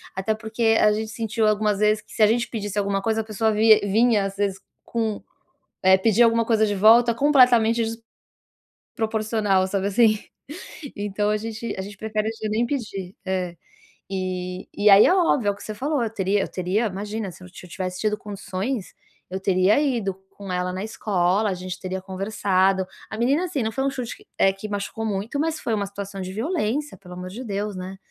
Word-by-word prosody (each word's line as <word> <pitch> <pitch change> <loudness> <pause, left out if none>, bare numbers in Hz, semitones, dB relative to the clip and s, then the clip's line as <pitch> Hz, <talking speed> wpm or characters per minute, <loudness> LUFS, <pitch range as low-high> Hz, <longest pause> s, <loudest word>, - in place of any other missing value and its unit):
até 195 +3 -1
porque 225 +1 +1
a 210 - +5
gente 220 +1 -3
sentiu 225 -1 0
algumas 210 -1 +1
vezes 215 0 +3
que - - -21
se - - -3
a - - +7
gente 235 +2 +1
pedisse 205 -3 -4
alguma 200 -1 0
coisa, 220 +2 0
a - - -6
pessoa 220 +1 0
vi 215 0 +6
vinha 210 +1 +3
às 195 0 -5
vezes 200 -1 -1 0.3
com, 225 -3 -2 0.6
eh, 190 0 +6
pedia 225 +3 +4
alguma 230 0 +3
coisa 220 -1 +3
de 205 - -1
volta 230 +4 +6
completamente 240 -4 +4 0.9
desproporcional, 215 -4 0
sabe, 195 0 -1
assim, 215 +1 +4 0.8
então 205 0 -1
a 210 - +2
gente 225 +1 -5
a - - -2
gente 200 +1 -9
prefere 215 0 -2
já 215 - -1
nem 225 +3 +1
pedir, 200 -8 -4
é. 185 -2 -2 0.6
E 185 -1 -4
e 205 +1 +4
aí 200 +1 +9
é - - +4
óbvio, 295 - +2
é - - +3
o - - -7
que - - -12
você 215 - -5
falou, 280 +4 -1
eu 225 - -1
teria 200 -1 +1
eu - - -2
teria, 190 +5 0
imagina, 205 +1 -4
se 180 - -14
eu - - -10
t 180 0 -12
tivesse 185 +1 -5
tido 210 -1 0
condições, 205 +2 -4 0.4
eu 190 - -4
teria 190 +4 +3
ido 240 -9 0 0.2
com 200 -2 -9
ela 180 0 -1
na 185 +2 -4
escola, 200 -1 0
a - - 0
gente 185 0 -6
teria 185 0 -4
conversado, 190 0 +1 0.2
a - - -6
menina, 275 +8 +2
assim, 325 -7 -2
não 220 - -1
foi 265 +4 -2
um - - +2
chute 250 -3 -5
que, - - -20
eh, 195 - +5
que 195 +2 -7
machucou 205 +2 -4
muito, 215 +6 -2
mas 315 +1 -1
foi 230 - -2
uma 205 -1 -1
situação 200 0 -7
de 185 0 -6
violência, 290 - -2
pelo 180 -2 -12
amor 180 0 -7
de 225 +7 -7
Deus, 205 -1 -3
né, 185 +1 -7
210 Hz, 205 wpm, -23 LUFS, 190-225 Hz, 0.9 s, aí